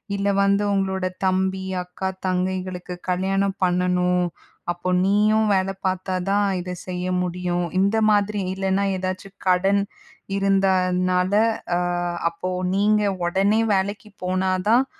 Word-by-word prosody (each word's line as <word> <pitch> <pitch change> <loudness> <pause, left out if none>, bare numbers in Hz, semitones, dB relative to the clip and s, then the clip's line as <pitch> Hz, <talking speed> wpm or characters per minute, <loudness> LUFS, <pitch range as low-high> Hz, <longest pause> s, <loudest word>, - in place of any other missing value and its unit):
இல்ல 200 0 -1 0.2
வந்து, 200 +1 +2
"உங்களோட 190 -1 0 0.2
தம்பி, 190 0 0 0.2
அக்கா, 180 +1 -4 0.2
தங்கைகளுக்கு 185 -1 -2
கல்யாணம் 195 +2 0
பண்ணணும். 180 0 +1 0.5
அப்போ 175 +1 -4 0.2
நீயும் 215 +2 +3
வேல 190 0 +1 0.2
பாத்தாதான், 185 +2 0
இத 180 0 -5
செய்ய 180 0 -3 0.2
முடியும்." 175 0 -1 0.2
இந்த 200 +3 +2 0.2
மாதிரி. 205 0 +1
இல்லனா 195 +1 0
ஏதாச்சும் 185 +1 -5
கடன் 195 +2 +3 0.6
இருந்தனால, 185 -1 +2 0.4
அ - - +1 0.5
அப்போ 185 +2 -4 0.2
நீங்க 210 +1 +3 0.3
ஒடனே 195 +5 +2
வேலைக்கு 205 +3 -2
போனா 185 +1 0 0.2
தான் 245 +4 +5
190 Hz, 110 wpm, -23 LUFS, 180-200 Hz, 0.6 s, தான்